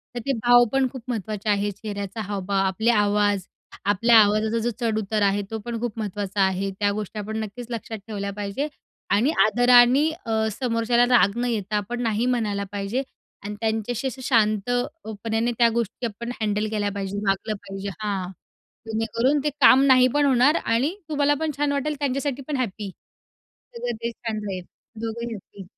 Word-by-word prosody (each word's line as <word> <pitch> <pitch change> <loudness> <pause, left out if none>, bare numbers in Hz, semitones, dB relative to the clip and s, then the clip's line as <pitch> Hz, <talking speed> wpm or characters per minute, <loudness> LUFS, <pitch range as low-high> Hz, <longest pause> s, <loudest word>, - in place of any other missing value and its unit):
तर - - -2
ते 275 - +1
भाव 245 0 +7
पण 270 -1 +3
खूप 260 -3 -8
महत्त्वाचे 215 -2 -3
आहेत. 205 0 +1
चेहऱ्याचा 200 0 -4
हावभाव, 195 -1 -1
आपले 220 +5 0
आवाज, 205 -2 +2 0.4
आपल्या 225 +3 +5
आवाजाचा 215 +2 +3
जो 235 - 0
चढउतार 220 -2 -1
आहे 200 0 +2
तो 220 - -2
पण 235 -1 -3
खूप 230 -2 -3
महत्त्वाचा 205 -1 -2
आहे. 190 +1 +1
त्या 205 -1 +2
गोष्टी 210 +1 -5
आपण 215 +1 -4
नक्कीच 225 +3 -8
लक्षात 225 -1 -5
ठेवल्या 200 -2 -4
पाहिजे 205 +8 -3 0.4
आणि 230 +10 +3
आदरांनी 245 +6 +5 0.2
अ, 220 -1 +1
समोरच्याला 235 +1 +1
राग 200 +2 +2
न 245 - 0
येता 210 -2 -2
आपण 240 +4 -3
नाही 225 0 0
म्हणायला 215 -5 0
पाहिजे 205 +6 -2 0.4
आणि 210 +1 -5
त्यांच्याशी 225 +3 -1
असं 260 +1 -6
अ, - - -9
शांतपणाने 225 0 0
त्या 235 -1 +5
गोष्टी 235 +1 -2
आपण 235 +2 -5
हँडल 210 0 0
केल्या 205 -1 0
पाहिजे. 200 0 -4
वागलं 195 +3 0
पाहिजे 195 +1 -5
हां. 195 -3 -3 0.6
जेणेकरून 230 +6 +1
ते 300 - +2
काम 260 0 +8
नाही 255 -1 +6
पण 290 0 +3
होणार 270 +3 +4
आणि 260 +11 +1
तुम्हाला 290 -1 +2
पण 315 -1 -1
छान 290 -1 +1
वाटेल. 290 +2 -1
त्यांच्यासाठी 275 0 -1
पण 295 -3 -1
हॅप्पी. 210 -4 -3 0.9
सगळं 240 0 -3
ते 235 - -1
छान 225 -2 -5
राहील 185 -3 -4 0.4
दोघंही 235 +1 -4
हॅप्पी. 200 -1 -11
220 Hz, 170 wpm, -24 LUFS, 205-245 Hz, 0.9 s, काम